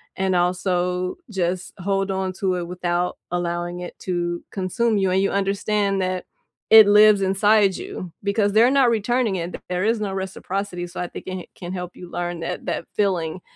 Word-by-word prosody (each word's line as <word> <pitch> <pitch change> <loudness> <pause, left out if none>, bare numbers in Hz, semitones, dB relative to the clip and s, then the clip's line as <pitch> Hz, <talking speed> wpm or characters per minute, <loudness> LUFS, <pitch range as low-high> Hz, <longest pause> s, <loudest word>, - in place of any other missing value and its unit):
and 190 -1 0
also 180 0 0
just 180 -2 -2
hold 195 +1 0
onto 190 0 -1
it 175 - -3
without 180 0 -1
allowing 175 0 -2
it 175 - -8
to 175 -1 -2
consume 210 +4 0
you, 190 -1 +2
and 185 - +3
you 195 - +1
understand 200 0 0
that 185 0 -2 0.4
it 220 -2 +9
lives 210 0 +6
inside 195 +1 +3
you 180 - -7
because 200 0 +1
they're 225 +3 +6
not 270 -3 +4
returning 230 -1 +1
it, 175 - -2
and 175 - -6
there 180 0 -1
is 225 +1 +2
no 200 -2 -2
reciprocity, 190 -1 -4
so 175 - -8
I 180 - -2
think - - -9
it 185 - -4
ca 180 - -8
can 180 0 -7
help 180 -1 -6
you 180 - -10
learn 175 -1 -3
that - - -4
that - - -2
feeling 180 -4 0
185 Hz, 185 wpm, -22 LUFS, 180-200 Hz, 0.4 s, it